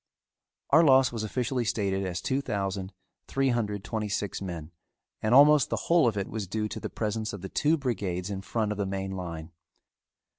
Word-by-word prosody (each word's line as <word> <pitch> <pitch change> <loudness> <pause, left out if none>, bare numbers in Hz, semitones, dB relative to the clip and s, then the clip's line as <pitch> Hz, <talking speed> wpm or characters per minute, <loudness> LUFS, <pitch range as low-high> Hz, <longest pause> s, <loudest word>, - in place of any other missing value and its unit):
Our 160 +4 +7
loss 130 -4 +5
was 115 -2 -4
officially 125 +3 -1
stated 100 -3 -1
as 90 -1 -3
two 135 +1 0
thousand, 95 -5 -3 0.4
three 135 0 +1
hundred, 105 -5 -1
twenty 110 -1 -3
six 100 0 -2
men 85 -4 -6 0.5
and 110 +3 +3
almost 145 0 +7
the - - 0
whole 170 -6 +3
of 110 -3 0
it 100 - -1
was 110 -3 -4
due 105 +3 -2
to - - -5
the - - -5
presence 110 0 -3
of 100 - -7
the 95 - -5
two 155 +3 +2
brigades 100 - -2
in 95 -1 -4
front 105 +2 -1
of 105 - -4
the 100 - 0
main 95 0 -3
line. 85 -4 -6
105 Hz, 195 wpm, -28 LUFS, 95-125 Hz, 0.5 s, Our